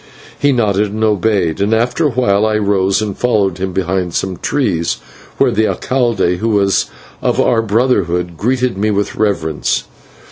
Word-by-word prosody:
He 145 Hz, -, +3 dB
nodded 105 Hz, -4 st, +1 dB
and 110 Hz, +1 st, -3 dB
obeyed, 100 Hz, -4 st, +1 dB
and 105 Hz, +3 st, +2 dB
after 125 Hz, +7 st, +1 dB
a -, -, 0 dB
while 110 Hz, -5 st, +1 dB
I 110 Hz, 0 st, +2 dB
rose 100 Hz, -1 st, +1 dB
and 100 Hz, -3 st, -4 dB
followed 100 Hz, -7 st, 0 dB
him 95 Hz, 0 st, -2 dB
behind 90 Hz, -1 st, -2 dB
some 95 Hz, -2 st, -2 dB
trees, 90 Hz, -, -1 dB, 0.4 s
where -, -, +3 dB
the 110 Hz, +2 st, +1 dB
/alcalde/, 115 Hz, -9 st, 0 dB
who 115 Hz, +4 st, -1 dB
was 100 Hz, -2 st, +2 dB, 0.3 s
of -, -, 0 dB
our 115 Hz, -2 st, +3 dB
brotherhood, 100 Hz, -7 st, 0 dB
greeted 125 Hz, +2 st, -1 dB
me 105 Hz, +2 st, +1 dB
with 100 Hz, -1 st, -1 dB
reverence. 80 Hz, -8 st, 0 dB
105 Hz, 165 wpm, -15 LUFS, 95-115 Hz, 0.4 s, He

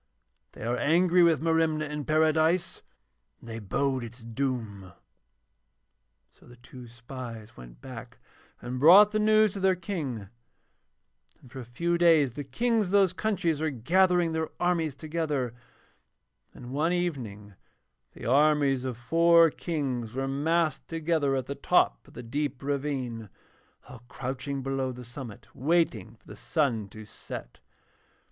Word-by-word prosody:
They -, -, -10 dB
are 120 Hz, +1 st, 0 dB
angry 175 Hz, +4 st, +3 dB
with 165 Hz, -3 st, +4 dB
Merimna 160 Hz, -2 st, +1 dB
in 150 Hz, -1 st, -5 dB
Paradise 160 Hz, +3 st, +2 dB, 0.6 s
and -, -, -15 dB
they 115 Hz, 0 st, -6 dB
bode 130 Hz, +5 st, -1 dB
its 115 Hz, +1 st, -10 dB
doom.' 115 Hz, -6 st, -4 dB, 1.4 s
So -, -, -22 dB
the 120 Hz, -, -14 dB
two 125 Hz, 0 st, -13 dB
spies 115 Hz, -1 st, -9 dB
went -, -, -13 dB
back -, -, -10 dB, 0.5 s
and 125 Hz, +1 st, -4 dB
brought 190 Hz, +8 st, +8 dB
the 215 Hz, -, 0 dB
news 215 Hz, -1 st, +4 dB
to 200 Hz, -, -5 dB
their 190 Hz, -1 st, +3 dB
King, 150 Hz, -, -5 dB, 1.1 s
and 125 Hz, -, -18 dB
for 135 Hz, -, -8 dB
a 125 Hz, -, -7 dB
few 170 Hz, +8 st, -1 dB
days 160 Hz, -7 st, +4 dB
the 145 Hz, +3 st, -5 dB
Kings 225 Hz, -, 0 dB
of -, -, -6 dB
those 195 Hz, -3 st, +4 dB
countries 170 Hz, -8 st, -1 dB
were 160 Hz, -, +1 dB
gathering 175 Hz, +6 st, +2 dB
their 160 Hz, 0 st, -2 dB
armies 170 Hz, -5 st, 0 dB
together; 150 Hz, -5 st, -2 dB, 1.0 s
and 125 Hz, 0 st, -11 dB
one 155 Hz, +5 st, 0 dB
evening 120 Hz, -, -4 dB, 0.6 s
the -, -, -10 dB
armies 140 Hz, 0 st, +3 dB
of 130 Hz, -3 st, -4 dB
four 165 Hz, +5 st, +4 dB
Kings 130 Hz, -10 st, -3 dB
were 135 Hz, 0 st, -2 dB
massed 155 Hz, +3 st, 0 dB
together 160 Hz, -4 st, 0 dB
at 130 Hz, -2 st, -2 dB
the 140 Hz, -, -4 dB
top -, -, +1 dB
of -, -, -18 dB
the 125 Hz, -, -8 dB
deep 140 Hz, +2 st, -3 dB
ravine, 135 Hz, -6 st, -3 dB, 0.6 s
all 125 Hz, -3 st, -12 dB
crouching 135 Hz, +2 st, -5 dB
below 135 Hz, -1 st, -2 dB
the 125 Hz, 0 st, -10 dB
summit 120 Hz, -2 st, -10 dB
waiting 165 Hz, +6 st, 0 dB
for -, -, -33 dB
the -, -, -11 dB
sun 115 Hz, -10 st, -1 dB
to 110 Hz, +1 st, -11 dB
set. -, -, -10 dB
140 Hz, 145 wpm, -27 LUFS, 120-165 Hz, 1.4 s, brought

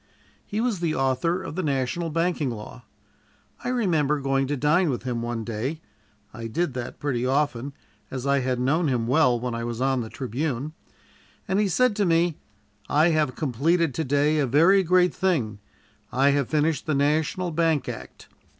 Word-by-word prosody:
He 210 Hz, -, -3 dB
was 235 Hz, -6 st, 0 dB
the 165 Hz, -2 st, -1 dB
author 135 Hz, +7 st, 0 dB
of -, -, -6 dB
the 185 Hz, -, -2 dB
national 145 Hz, +2 st, -1 dB
banking 165 Hz, -3 st, 0 dB
law. 105 Hz, -, -8 dB, 0.8 s
I 245 Hz, -, -2 dB
remember 160 Hz, -, +1 dB
going 135 Hz, 0 st, 0 dB
to 145 Hz, +1 st, -1 dB
dine 150 Hz, +5 st, +3 dB
with 125 Hz, -, -2 dB
him 120 Hz, -2 st, -2 dB
one 120 Hz, -1 st, -3 dB
day 120 Hz, +8 st, -3 dB, 0.5 s
I 115 Hz, 0 st, -6 dB
did 155 Hz, +5 st, -1 dB
that 125 Hz, 0 st, -6 dB
pretty 130 Hz, -5 st, -1 dB
often, 135 Hz, 0 st, 0 dB, 0.4 s
as 130 Hz, 0 st, -5 dB
I 140 Hz, 0 st, +3 dB
had 130 Hz, -1 st, -1 dB
known 150 Hz, +7 st, +1 dB
him 125 Hz, -4 st, 0 dB
well 125 Hz, -1 st, +3 dB
when 125 Hz, 0 st, -3 dB
I 115 Hz, 0 st, -3 dB
was 120 Hz, 0 st, -4 dB
on 130 Hz, -1 st, +1 dB
the 110 Hz, -, -6 dB
Tribune 135 Hz, +3 st, -3 dB, 0.7 s
and 190 Hz, 0 st, +1 dB
he 210 Hz, -, +2 dB
said 250 Hz, +4 st, +2 dB
to 205 Hz, -, +2 dB
me: 165 Hz, -1 st, +2 dB, 0.5 s
"I 155 Hz, +4 st, +4 dB
have 155 Hz, -5 st, +1 dB
completed 155 Hz, +3 st, +1 dB
to 160 Hz, -, -1 dB
day 145 Hz, +2 st, +2 dB
a 140 Hz, -, +1 dB
very 165 Hz, +10 st, +5 dB
great 180 Hz, 0 st, +3 dB
thing. 130 Hz, -, 0 dB, 0.5 s
I 135 Hz, +2 st, +3 dB
have 140 Hz, -3 st, 0 dB
finished 155 Hz, +1 st, 0 dB
the 155 Hz, -, +1 dB
National 155 Hz, +5 st, +1 dB
Bank 165 Hz, -2 st, +1 dB
Act. -, -, -8 dB
145 Hz, 180 wpm, -25 LUFS, 125-165 Hz, 0.8 s, very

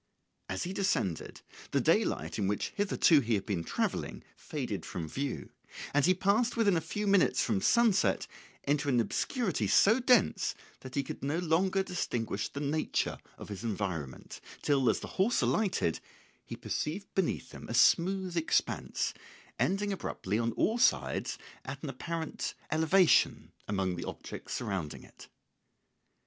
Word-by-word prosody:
] -, -, -48 dB
As 95 Hz, -, -2 dB
he 180 Hz, -, -4 dB
descended, 185 Hz, -, -1 dB, 0.3 s
the -, -, +1 dB
daylight 80 Hz, +7 st, +1 dB
in 100 Hz, -, +1 dB
which 105 Hz, +1 st, -1 dB
hitherto 195 Hz, -6 st, +4 dB
he 115 Hz, -4 st, +1 dB
had 100 Hz, -2 st, -2 dB
been 95 Hz, -6 st, -2 dB
travelling -, -, -2 dB
faded -, -, -4 dB
from 80 Hz, -3 st, -5 dB
view, 135 Hz, -, -4 dB, 0.4 s
and 145 Hz, +2 st, +4 dB
he 185 Hz, -, +5 dB
passed 215 Hz, +6 st, +2 dB
within 205 Hz, -5 st, +4 dB
a 165 Hz, -, +1 dB
few 205 Hz, +6 st, -3 dB
minutes 195 Hz, -10 st, +4 dB
from 105 Hz, -5 st, 0 dB
sunset 210 Hz, -, +3 dB, 0.4 s
into 145 Hz, 0 st, +1 dB
an 125 Hz, -3 st, +3 dB
obscurity 180 Hz, -, 0 dB
so 220 Hz, -, +5 dB
dense 250 Hz, -4 st, +3 dB, 0.2 s
that 130 Hz, -1 st, -10 dB
he 140 Hz, -, +1 dB
could -, -, -7 dB
no 145 Hz, +4 st, 0 dB
longer 180 Hz, +3 st, +2 dB
distinguish 120 Hz, -, -2 dB
the 140 Hz, -, -6 dB
nature 150 Hz, +2 st, -1 dB, 0.2 s
of -, -, -10 dB
his 100 Hz, +1 st, -6 dB
environment, 95 Hz, -, -4 dB, 0.2 s
till, 135 Hz, -4 st, +3 dB
as -, -, +1 dB
the -, -, -6 dB
horse 225 Hz, +5 st, +2 dB
alighted, 195 Hz, -, +1 dB, 0.5 s
he -, -, -5 dB
perceived 195 Hz, +7 st, -4 dB
beneath 165 Hz, -8 st, -1 dB
him -, -, -10 dB
a 115 Hz, -, -2 dB
smooth 185 Hz, +7 st, +3 dB
expanse 165 Hz, -1 st, 0 dB, 0.5 s
ending 200 Hz, +2 st, +1 dB
abruptly 105 Hz, -, -2 dB
on 115 Hz, 0 st, 0 dB
all 225 Hz, -, +1 dB
sides 255 Hz, -, +2 dB, 0.3 s
at -, -, -7 dB
an -, -, -3 dB
apparent 165 Hz, -2 st, -4 dB, 0.2 s
elevation 160 Hz, +3 st, +3 dB, 0.2 s
among 95 Hz, -3 st, -1 dB
the 85 Hz, -, -5 dB
objects -, -, -6 dB
surrounding 95 Hz, -8 st, -4 dB
it. -, -, -15 dB
155 Hz, 155 wpm, -31 LUFS, -, 0.5 s, he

